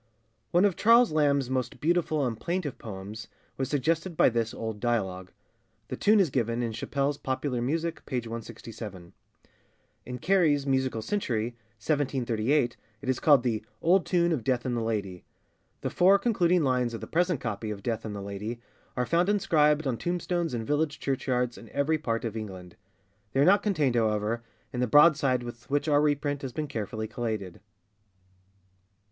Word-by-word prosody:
[ONE 180 +3 +4
of 195 -4 +2
Charles 230 0 +5
Lamb's 140 -3 +2
most 130 -1 -2
beautiful 155 -3 +1
and 115 -3 -3
plaintive 170 -1 -3
poems 105 +1 -8 0.3
was 135 -1 -2
suggested 160 +5 0
by - - +6
this 115 -1 -1
old 110 -2 -5
dialogue. 95 -6 -1 0.6
The - - -3
tune 215 +1 +4
is 180 -8 +3
given 120 -1 0
in 115 - -2
Chappell's 140 +5 -2
Popular 130 -1 -2
Music, 165 +6 -2
p. 135 - -4
167. 115 -5 -7 0.9
In 125 0 -5
Carey's 155 -3 +2
Musical 130 -4 0
Century, 120 - -1 0.3
1738, 125 -1 0 0.3
it 130 - -4
is 130 - +1
called 145 -5 +5
the 110 -4 -1 0.2
'Old 180 +1 +3
tune 175 -1 +2
of 145 -8 -1
Death 125 -1 0
and 125 -1 -1
the 120 - -1
Lady.' 100 -5 -3 0.6
The - - -2
four 190 +3 +5
concluding 180 -6 +2
lines 125 -3 +1
of - - -7
the - - -5
present 175 -2 +1
copy 110 -2 -4
of 100 -2 -6
Death 115 -2 -2
and 105 -2 -5
the 100 - -5
Lady 105 +4 -5 0.4
are 125 - +1
found 175 +6 +2
inscribed 155 -7 +3
on 130 -4 0
tomb 175 +6 -2
stones 175 -6 -1
in 115 -1 -3
village 150 +2 0
church 135 -2 -2
yards 125 -1 0
in 115 - -13
every 155 +3 0
part 115 -5 -2
of 115 -1 -4
England. 95 -5 -7 0.6
They 135 - +1
are 140 - +5
not 200 +3 +5
contained, 155 - +1
however, 110 0 +1 0.3
in 125 - -3
the 125 - +1
broadside 145 -3 +5
with 120 0 -9
which 145 +2 0
our 145 -1 +4
reprint 145 -1 0
has 130 -3 -5
been 155 -1 -3
carefully 110 -2 -4
collated. 110 -7 -4
130 Hz, 175 wpm, -28 LUFS, 115-155 Hz, 0.9 s, by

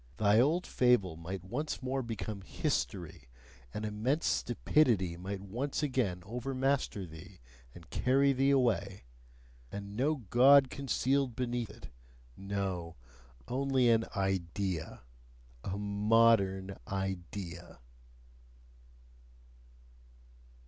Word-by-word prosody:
Thy 105 0 +4
old 160 +8 +3
fable 120 -9 +2
might 85 +3 -6
once 130 +9 -4
more 130 +1 -1
become 110 -3 -5
"history" 65 -7 -3 0.4
an 105 - -4
immense 115 +9 -1
stupidity 120 - +2
might 95 +3 -5
once 125 +10 -3
again 120 -11 -1
overmaster 130 -2 -1
thee 85 +3 -12 0.4
and 85 -1 -13
carry 135 +2 +3
thee 135 +1 +2
away! 110 -8 +1 0.7
And 100 0 -7
no 140 +7 +1 0.2
God 135 +2 +7
concealed 135 -1 0
beneath 120 -2 -2
it - - -12 0.5
no! 95 -4 -3 0.5
only 130 -1 +2
an 115 0 +3
"idea," 95 -2 -2 0.6
a 95 +1 -3
"modern 100 -2 +2
idea"! 95 -2 -5
105 Hz, 95 wpm, -32 LUFS, 95-130 Hz, 0.7 s, God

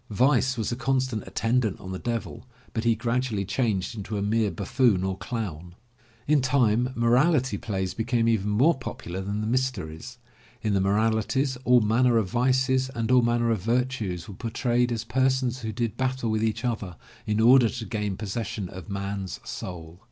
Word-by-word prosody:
Vice 130 +3 +2
was 110 0 -1
a - - -1
constant 130 -3 -1
attendant 115 -3 0
on 95 - -8
the 95 - -4
Devil, 120 +1 -4 0.3
but 115 0 -2
he 115 -1 +4
gradually 115 -3 -1
changed 105 0 -1
into 105 0 -4
a - - -1
mere 110 +1 +1
buffoon 105 0 +1
or 95 0 -1
clown. 90 -7 -5 0.5
In 150 -1 +3
time 125 -2 +2
moral 125 +8 +4
ity 130 -7 -1
plays 95 -3 -3
became 115 0 0
even 105 -3 +1
more 130 +11 +4
popular 95 -7 -6
than 100 +2 -3
the - - -2
mysteries. 125 -3 -2 0.5
In 105 -2 +1
the 95 - +2
moralities, 110 +6 +1
all 125 -1 +6
manner 115 +3 +3
of 110 -4 +1
Vices 130 +1 +2
and 115 0 -1
all 125 -1 +6
manner 120 0 +1
of 110 -5 0
Virtues 115 -5 -1
were 100 - -8
por 115 +4 -5
trayed 120 0 +1
as 115 -1 -2
persons 130 +1 +1
who 110 -2 -4
did 115 -1 -3
battle 130 -3 -1
with 110 0 0
each 115 +2 -1
other 105 -7 -3 0.3
in 105 0 +1
order 120 +1 +6
to 115 -1 -5
gain 105 -2 -3
possession 105 -1 -4
of 95 +1 -10
man*s 100 -1 -4
soul. 85 -1 -7
115 Hz, 180 wpm, -26 LUFS, 100-125 Hz, 0.5 s, all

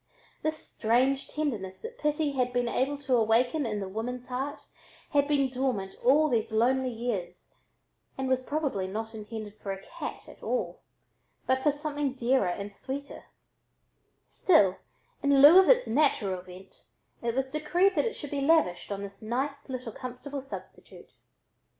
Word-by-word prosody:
This 310 0 -1
strange 260 +2 +1
tenderness 220 -12 -3
that 480 +2 -8
pity 300 0 +1
had 250 -2 0
been 245 -1 0
able 270 +4 0
to 270 -2 0
awaken 240 +5 +2
in 210 -2 -2
the 195 - -4
woman's 245 +5 -5
heart 280 +4 -3 0.5
had 285 -1 +3
been 285 -2 +3
dormant 250 -7 -1
all 290 +5 +5
these 230 -7 0
lonely 255 +4 +2
years 225 -7 -4 0.6
and 265 0 -2
was 260 0 +2
probably 270 -9 -2
not 220 +4 -5
intended 215 -1 -7
for 200 - -4
a 195 - -5
cat - - -7
at - - -14
all, - - -2 0.6
but 260 0 +2
for 295 - +4
something 290 -2 -2
dearer 255 -4 +2
and 200 +3 -4
sweeter; 275 +7 -6 1.0
still, 200 - +3 0.4
in 280 -1 +4
lieu 300 +7 +10
of 380 - +5
its - - +6
natural 220 -9 +1
vent, 185 +1 -14 0.4
it 235 0 -1
was 265 0 -1
decreed 350 +6 +2
it 335 +9 +1
should 290 - -7
be 285 -1 -1
lavished 275 - +2
on 200 0 -3
this 200 0 -9
nice 270 +6 -3
little 255 -4 -5
comfortable 255 +4 -6
substitute. 270 - -11
260 Hz, 155 wpm, -29 LUFS, 220-285 Hz, 1.0 s, lieu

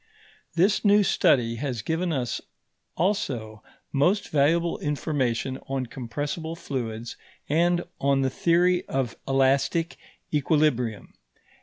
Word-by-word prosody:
This 190 +5 +3
new 205 0 +5
study 115 -10 +2
has 125 -5 -3
given 165 +4 -1
us 130 -5 -2 0.6
also 125 - -1 0.3
most 175 +9 +2
valuable 165 +4 +2
information 135 -4 -1
on 135 -1 -2
compressible 145 +7 -4
fluids 120 -7 -5 0.3
and 175 +3 +2 0.2
on 140 0 +2
the 130 - 0
theory 175 +4 +2
of 130 -3 -2
elastic 135 +5 +2 0.4
equilibrium. 145 -7 +1
140 Hz, 105 wpm, -26 LUFS, 125-170 Hz, 0.6 s, new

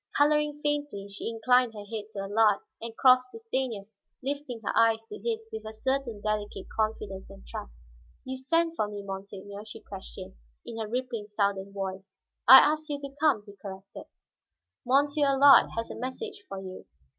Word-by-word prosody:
Coloring 295 0 +3
faintly, 290 -9 -1
she 200 +3 -4
inclined 240 +1 +3
her 205 -1 -8
head 215 0 -5
to 200 -2 -5
Allard, 205 +1 +3 0.2
and 230 0 -7
crossed 255 -1 +5
to - - -7
Stanief, 260 - -3 0.4
lifting 275 -3 -3
her - - -1
eyes 225 -1 +4
to 420 - -9
his 450 -1 -3
with 440 - -5
a 220 - -8
certain 260 -2 -2
delicate 210 -2 -2
confidence 215 -3 -2
and 65 - -13
trust. - - -9 0.4
"You 260 - -4
sent 330 +6 +1
for 215 - 0
me, 205 -1 -7
monsiegneur?" 200 +1 -7
she 215 - -9
questioned, 190 -1 -9 0.3
in 230 -1 -7
her 220 - -3
rippling 240 -2 -3
southern 200 -2 -1
voice. 195 0 -6 0.3
"I 260 +3 +13
asked 310 +1 +1
you 290 -1 -2
to 280 -1 -8
come," 285 -9 +3
he 205 -1 -13
corrected. 195 -1 -9 0.8
"Monsieur 285 +3 +3
Allard 275 +1 +7
has 230 - -2
a - - -6
message 405 - -6
for 195 - -5
you." 185 -1 -9
225 Hz, 175 wpm, -28 LUFS, 200-275 Hz, 0.8 s, I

